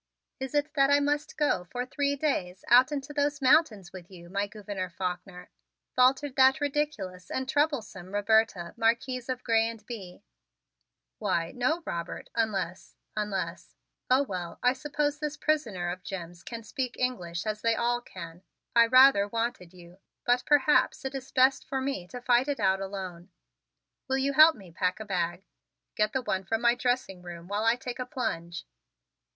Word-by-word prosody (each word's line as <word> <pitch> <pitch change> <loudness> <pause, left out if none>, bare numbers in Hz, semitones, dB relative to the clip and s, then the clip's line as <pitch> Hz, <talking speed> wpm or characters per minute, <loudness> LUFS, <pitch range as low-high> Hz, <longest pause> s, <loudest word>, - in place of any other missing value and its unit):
"Is 265 +2 -5
it 290 +1 0
that 275 -2 +4
I 285 0 +5
must 290 +1 -1
go 295 -12 +1
for 245 +7 -4
three 280 +2 -1
days 195 -12 -2
out 255 +3 +7
into 290 0 -4
those 290 0 0
mountains 250 - +3
with 180 -2 -10
you, 175 -2 -13
my 200 +1 0
Gouverneur 200 -3 -5
Faulkner?" 180 0 -5 0.4
faltered 260 +2 +3
that 265 +2 +6
ridiculous 280 - -2
and 260 0 -2
troublesome 265 - -1
Roberta, 205 -4 +2
Marquise 240 +2 0
of 255 -1 -3
Grez 225 -1 +3
and 225 -2 -10
Bye. 195 -7 -9 1.0
"Why, 165 -1 0
no, 310 +8 0
Robert, 170 0 -5
unless 195 -6 -2 0.2
unless 210 -3 -3 0.3
Oh, 260 +2 +5
well, 180 -8 -5
I 250 +1 +5
suppose 295 +1 -2
this 300 0 -3
prisoner 220 - 0
of 180 +1 -7
Jim's 175 -3 -7
can 230 +5 -7
speak 250 +3 -4
English 180 -8 -2
as 215 -1 -3
they 230 0 +2
all 240 +1 0
can. 170 -6 -10 0.3
I 230 0 +7
rather 255 -5 +7
wanted 230 -5 -3
you 180 0 -16 0.3
but 245 +1 +3
perhaps 295 -1 +3
it 265 - -3
is 270 -1 -7
best 260 +1 +4
for 265 - -2
me 260 -9 -3
to 245 +5 -8
fight 245 +1 +3
it 285 -3 -2
out 190 -1 +2
alone. 190 -2 -6 0.8
Will 265 0 +1
you 275 +1 0
help 310 +2 +8
me 190 -5 -14
pack 180 +4 -1
a 220 - -6
bag? 180 -1 -2 0.5
Get 215 0 +1
the 265 - -1
one 190 -5 -1
from 225 +4 -1
my 235 0 +5
dressing 245 -7 -1
room 175 -1 -9
while 205 +3 -1
I 225 +1 +4
take 250 0 -7
a 250 - -3
plunge." 170 - -4
230 Hz, 170 wpm, -28 LUFS, 185-265 Hz, 1.0 s, help